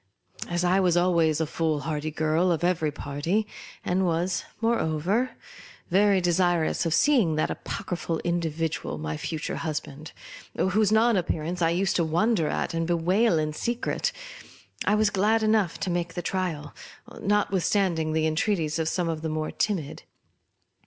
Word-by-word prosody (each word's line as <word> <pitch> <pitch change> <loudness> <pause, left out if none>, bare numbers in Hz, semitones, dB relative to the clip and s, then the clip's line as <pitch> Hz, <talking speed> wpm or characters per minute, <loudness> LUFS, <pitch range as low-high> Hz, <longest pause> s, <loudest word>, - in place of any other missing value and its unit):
As 175 0 -1
I 180 +2 +3
was 180 -2 +3
always 170 -3 +3
the 160 - 0
foolhardy 155 -1 -2
girl 155 +3 +1
of 165 0 -1
every 170 -4 +1
party, 145 +10 -2 0.4
and 185 +2 +1
was, 175 +1 0 0.2
moreover, 215 +1 0 0.6
very 200 +1 +4
desirous 175 -2 +1
of 165 - +1
seeing 235 - +3
that 155 - 0
apocryphal 175 -4 -4
individual, 165 - -2
my 75 0 -4
fu 160 - -4
ture 155 - -4
husband 155 -1 -5 0.5
(whose 205 +2 +2
non 225 0 +4
appearance 175 0 -2
I 165 - +4
used 180 +2 +1
to 170 - +2
wonder 170 +2 +1
at - - -2
and 165 0 -1
bewail 175 +4 +2
in 155 -1 -1
secret,) 240 - -1 0.7
I 210 - +3
was 215 -1 +2
glad 215 +3 +2
enough 215 -5 +2
to 190 - -1
make 175 -1 -2
the 175 - -3
trial, 170 -6 -3 0.5
nothwithstanding 190 -5 +1
the 160 0 +1
entreaties 160 -1 0
of 160 0 0
some 180 -1 -1
of 160 -2 -2
the 160 - -2
more 155 0 -2
timid. 180 -9 -2
175 Hz, 150 wpm, -26 LUFS, 160-195 Hz, 0.7 s, very